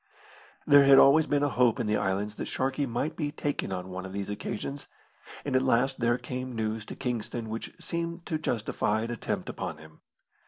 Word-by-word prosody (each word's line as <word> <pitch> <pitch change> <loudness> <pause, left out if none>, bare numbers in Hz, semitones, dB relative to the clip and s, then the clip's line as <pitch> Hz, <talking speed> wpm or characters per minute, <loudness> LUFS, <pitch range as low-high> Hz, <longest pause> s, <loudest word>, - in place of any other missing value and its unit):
There 145 -1 +7
had 135 0 +8
always 145 +4 +7
been 145 0 +2
a 145 - +2
hope 125 -4 +3
in - - 0
the 105 0 +1
islands 105 +2 -1
that - - -4
Sharkey 135 +2 -1
might 130 +7 -2
be 150 -3 -2
taken 145 -8 -2
on 90 0 -4
one 95 0 -5
of 95 - -7
these 100 0 -3
occasions; 135 +7 -5 0.6
and 140 -2 -1
at 130 - +5
last 130 +1 +2
there 120 0 +2
came 125 0 -5
news 110 0 -2
to - - -7
Kingston 120 -2 -3
which 115 +1 -5
seemed 170 0 -4
to 155 - -2
justify 110 -5 0
an 115 - -3
attempt 120 - -3
upon - - -4
him. 80 0 -16
120 Hz, 200 wpm, -28 LUFS, 105-140 Hz, 0.6 s, had